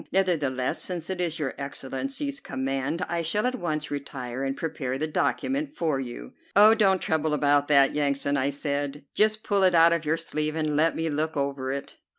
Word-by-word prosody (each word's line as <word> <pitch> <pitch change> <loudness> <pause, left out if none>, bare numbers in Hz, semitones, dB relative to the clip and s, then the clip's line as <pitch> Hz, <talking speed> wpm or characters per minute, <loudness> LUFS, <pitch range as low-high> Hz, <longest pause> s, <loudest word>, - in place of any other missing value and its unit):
Nevertheless, 150 -9 0
since 175 -1 -2
it 180 -1 -3
is 165 -2 -1
your 145 -5 -2
Excellency's 270 - -4
command, 135 - -2
I 170 0 -1
shall 170 +7 +1
at 250 - +1
once 155 -10 -3
retire 135 -3 -5
and 135 0 -2
prepare 135 -5 -3
the 155 - -1
document 275 - -1
for 155 -5 0
you." 120 - -7 0.2
"Oh, 210 +2 +8
don't 195 -4 +3
trouble 155 -2 0
about 145 0 +2
that, 140 -2 +5
Yansan," 140 -1 0
I 135 0 +1
said, 145 0 -3
"just 215 +1 +2
pull 200 -1 +1
it 185 -2 +4
out 165 0 +6
of 170 -1 -1
your 160 +1 +1
sleeve 155 -1 -2
and 155 -2 -1
let 160 +2 +3
me 165 - -1
look 155 +1 -1
over 140 -1 -2
it." 140 0 -6
155 Hz, 190 wpm, -26 LUFS, 140-175 Hz, 0.2 s, Oh